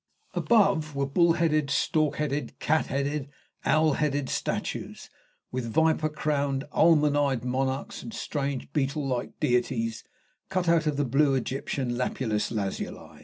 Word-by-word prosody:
Above 195 Hz, -10 st, +2 dB
were 140 Hz, 0 st, +1 dB
bull 170 Hz, +5 st, +3 dB
headed, 155 Hz, -4 st, +1 dB
stork 155 Hz, +1 st, +1 dB
headed, 150 Hz, -1 st, -2 dB
cat 155 Hz, +1 st, +1 dB
headed, 140 Hz, +1 st, -2 dB, 0.4 s
owl 155 Hz, -1 st, +4 dB
headed 145 Hz, -2 st, 0 dB
statues, -, -, -3 dB, 0.4 s
with 125 Hz, -2 st, -3 dB
viper 160 Hz, +2 st, +2 dB
crowned, 145 Hz, -3 st, -1 dB
almond 150 Hz, -3 st, +4 dB
eyed 135 Hz, -4 st, +1 dB
monarchs, 130 Hz, +2 st, -2 dB
and -, -, -8 dB
strange, 140 Hz, -, -3 dB
beetle 140 Hz, 0 st, 0 dB
like 125 Hz, -2 st, -3 dB
deities 120 Hz, -2 st, 0 dB, 0.5 s
cut 185 Hz, -2 st, -1 dB
out 165 Hz, -1 st, +3 dB
of 150 Hz, -2 st, 0 dB
the 145 Hz, -, +1 dB
blue 135 Hz, +2 st, +3 dB
Egyptian 130 Hz, -1 st, -2 dB
lapis 110 Hz, -4 st, -1 dB
lazuli. 100 Hz, -4 st, -4 dB
145 Hz, 135 wpm, -27 LUFS, 130-155 Hz, 0.5 s, owl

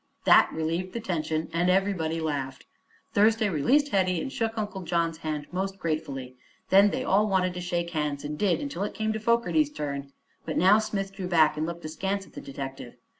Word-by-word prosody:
That -, -, +7 dB
relieved 165 Hz, +4 st, -2 dB
the 235 Hz, -, -3 dB
tension 160 Hz, -6 st, -2 dB
and 175 Hz, +2 st, +2 dB
everybody 180 Hz, -4 st, +1 dB
laughed. 145 Hz, -4 st, -3 dB, 0.5 s
Thursday 220 Hz, +1 st, +4 dB
released 265 Hz, -, +2 dB
Hetty 185 Hz, -5 st, +1 dB
and 270 Hz, -, -4 dB
shook 225 Hz, 0 st, -2 dB
Uncle 210 Hz, -3 st, -3 dB
John's 170 Hz, -1 st, -1 dB
hand 155 Hz, -2 st, -3 dB
most 195 Hz, +2 st, -3 dB
gratefully. 145 Hz, -7 st, -4 dB, 0.3 s
Then 200 Hz, +2 st, +7 dB
they -, -, -2 dB
all 205 Hz, +3 st, +3 dB
wanted 185 Hz, -2 st, +1 dB
to 180 Hz, -, -5 dB
shake 175 Hz, -1 st, -2 dB
hands, 150 Hz, -3 st, -2 dB
and 150 Hz, +1 st, -4 dB
did 195 Hz, -, +1 dB
until 280 Hz, -10 st, -4 dB
it 205 Hz, -, -4 dB
came 220 Hz, 0 st, -1 dB
to 220 Hz, -, -3 dB
Fogerty's 235 Hz, +7 st, +2 dB
turn. 140 Hz, -, -5 dB, 0.3 s
But -, -, -3 dB
now 195 Hz, +5 st, +6 dB
Smith 195 Hz, -3 st, -3 dB
drew 190 Hz, -2 st, -5 dB
back 160 Hz, -4 st, +4 dB
and 155 Hz, +1 st, -2 dB
looked 170 Hz, -1 st, -6 dB
askance 195 Hz, +5 st, -2 dB
at -, -, -20 dB
the -, -, -8 dB
detective. 135 Hz, -2 st, -7 dB
180 Hz, 195 wpm, -27 LUFS, 155-205 Hz, 0.5 s, That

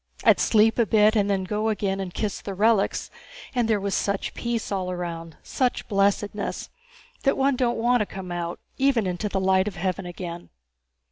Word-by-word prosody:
I'd -, -, +5 dB
sleep 225 Hz, +1 st, +4 dB
a 230 Hz, -, +3 dB
bit 215 Hz, +2 st, +4 dB
and 205 Hz, -2 st, +2 dB
then 195 Hz, -1 st, +1 dB
again -, -, -4 dB
go 210 Hz, +3 st, -1 dB
and 195 Hz, -3 st, -2 dB
kiss 210 Hz, -3 st, -2 dB
the 195 Hz, -, -5 dB
relics, 215 Hz, 0 st, +2 dB, 0.4 s
and 245 Hz, -3 st, +1 dB
there 220 Hz, -2 st, +2 dB
was 200 Hz, 0 st, -2 dB
such 200 Hz, -1 st, -1 dB
peace 235 Hz, -2 st, -3 dB
all 190 Hz, -2 st, -1 dB
around, 170 Hz, -2 st, -5 dB
such 255 Hz, -2 st, -1 dB
blessedness, 200 Hz, 0 st, 0 dB, 0.5 s
that 275 Hz, -, +2 dB
one 275 Hz, 0 st, +3 dB
don't 245 Hz, -1 st, 0 dB
want 240 Hz, +2 st, +3 dB
to 210 Hz, -, 0 dB
come 190 Hz, -2 st, -7 dB
out, 175 Hz, 0 st, -3 dB, 0.2 s
even 265 Hz, -5 st, +3 dB
into 185 Hz, +3 st, -2 dB
the 195 Hz, -, -1 dB
light 190 Hz, +1 st, +3 dB
of 205 Hz, -, -4 dB
heaven 185 Hz, +1 st, -2 dB
again." 175 Hz, -1 st, -7 dB
200 Hz, 190 wpm, -25 LUFS, 185-225 Hz, 0.5 s, I'd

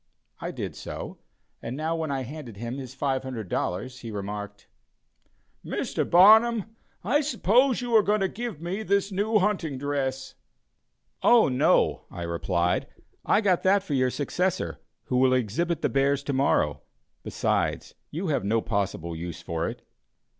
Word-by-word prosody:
I -, -, -4 dB
did -, -, -5 dB
so, -, -, -7 dB, 0.4 s
and 120 Hz, +3 st, -5 dB
now 160 Hz, +2 st, -1 dB
when 160 Hz, -2 st, -3 dB
I 135 Hz, -1 st, -1 dB
handed 130 Hz, -4 st, -8 dB
him 120 Hz, +5 st, -5 dB
his 130 Hz, -1 st, -8 dB
$500, 130 Hz, -3 st, -2 dB
he 115 Hz, -, -7 dB
remarked: 105 Hz, 0 st, -6 dB, 1.0 s
"Mr. -, -, -2 dB
Barnum, 220 Hz, +4 st, +6 dB, 0.3 s
I 265 Hz, -, +2 dB
suppose 250 Hz, -, +2 dB
you 240 Hz, -2 st, 0 dB
are 220 Hz, -, +8 dB
going 210 Hz, 0 st, +1 dB
to 195 Hz, -, +2 dB
give 225 Hz, -4 st, -5 dB
me 185 Hz, +5 st, -3 dB
this 200 Hz, -1 st, +1 dB
new 210 Hz, +3 st, +1 dB
hunting 185 Hz, -8 st, 0 dB
dress?" 135 Hz, -1 st, -2 dB, 0.9 s
"Oh, 235 Hz, -8 st, +6 dB
no," 125 Hz, 0 st, +2 dB
I 85 Hz, -, -7 dB
replied, 85 Hz, +1 st, 0 dB, 0.4 s
"I 210 Hz, -, +4 dB
got 190 Hz, -5 st, +2 dB
that 195 Hz, +1 st, +3 dB
for 165 Hz, -, -4 dB
your 130 Hz, -2 st, +2 dB
successor, 180 Hz, +7 st, -2 dB, 0.2 s
who 125 Hz, -, -1 dB
will 130 Hz, 0 st, +4 dB
exhibit 155 Hz, -, 0 dB
the -, -, +4 dB
bears 140 Hz, +1 st, +1 dB
to 140 Hz, -, -2 dB
morrow; 130 Hz, -, +1 dB, 0.4 s
besides, -, -, -1 dB, 0.2 s
you 170 Hz, +3 st, -3 dB
have 140 Hz, -8 st, 0 dB
no 110 Hz, +3 st, +2 dB
possible 95 Hz, -6 st, -2 dB
use 85 Hz, 0 st, -6 dB
for 85 Hz, 0 st, -2 dB
it." -, -, -9 dB
140 Hz, 155 wpm, -26 LUFS, 115-195 Hz, 1.0 s, are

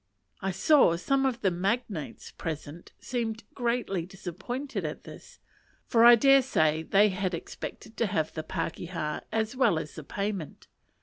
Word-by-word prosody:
I 195 Hz, -, -1 dB
saw 195 Hz, -, +4 dB
some 270 Hz, +10 st, +1 dB
of 250 Hz, -2 st, -3 dB
the 190 Hz, -, +2 dB
magnates 190 Hz, -, -3 dB
present 160 Hz, +1 st, -7 dB
seemed 230 Hz, -3 st, -3 dB
greatly 235 Hz, -8 st, -1 dB
disappointed 195 Hz, -, -5 dB
at -, -, -5 dB
this, -, -, -12 dB, 0.5 s
for 230 Hz, -1 st, +4 dB
I 240 Hz, 0 st, +10 dB
dare 275 Hz, +4 st, +6 dB
say 155 Hz, -11 st, +1 dB
they 200 Hz, +5 st, +4 dB
had 185 Hz, -2 st, -2 dB
expected 220 Hz, +6 st, -8 dB
to 230 Hz, -, +1 dB
have 160 Hz, -4 st, -1 dB
the 160 Hz, -, -3 dB
pakeha 165 Hz, -1 st, -4 dB
as 220 Hz, +2 st, -1 dB
well 250 Hz, -10 st, +3 dB
as 160 Hz, -1 st, -5 dB
the 155 Hz, -, -8 dB
payment. 195 Hz, -1 st, -4 dB
195 Hz, 150 wpm, -28 LUFS, 165-240 Hz, 0.5 s, I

